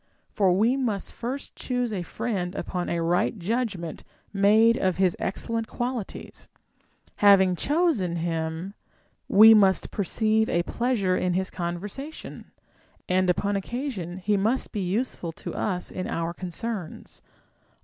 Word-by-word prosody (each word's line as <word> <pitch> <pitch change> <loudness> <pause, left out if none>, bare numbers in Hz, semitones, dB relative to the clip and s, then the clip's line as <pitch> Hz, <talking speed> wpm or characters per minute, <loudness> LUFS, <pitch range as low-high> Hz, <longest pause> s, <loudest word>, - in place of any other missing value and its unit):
For 195 -3 +3
we 220 +8 +3
must 230 -7 -2
first 255 +4 -6
choose 245 -3 -2
a 190 - -2
friend 190 -1 -3
upon 180 -1 -3
a 170 -1 -1
right 175 +6 +1
judgment 195 -4 -3 0.3
made 215 +3 +5
of 185 -5 0
his 185 -2 +2
excellent 225 +3 -2
qualities; 240 -4 -5 0.7
having 190 -3 +6
chosen 285 - +1
him, 165 +2 -3 0.5
we 220 +3 +9
must 195 -3 +4
perceive 220 +2 +1
a 170 - +1
pleasure 225 -5 0
in 180 -1 0
his 190 0 -1
conversation, 200 - -6 0.6
and 185 0 +2
upon 200 +3 +1
occasion 200 - -4
he 205 +2 +1
must 225 +7 0
be 210 - -3
useful 185 -2 -2
to - - -7
us 180 -4 -2
in 185 - -4
our 165 0 -2
concerns. 185 +1 -6
195 Hz, 130 wpm, -26 LUFS, 180-230 Hz, 0.7 s, we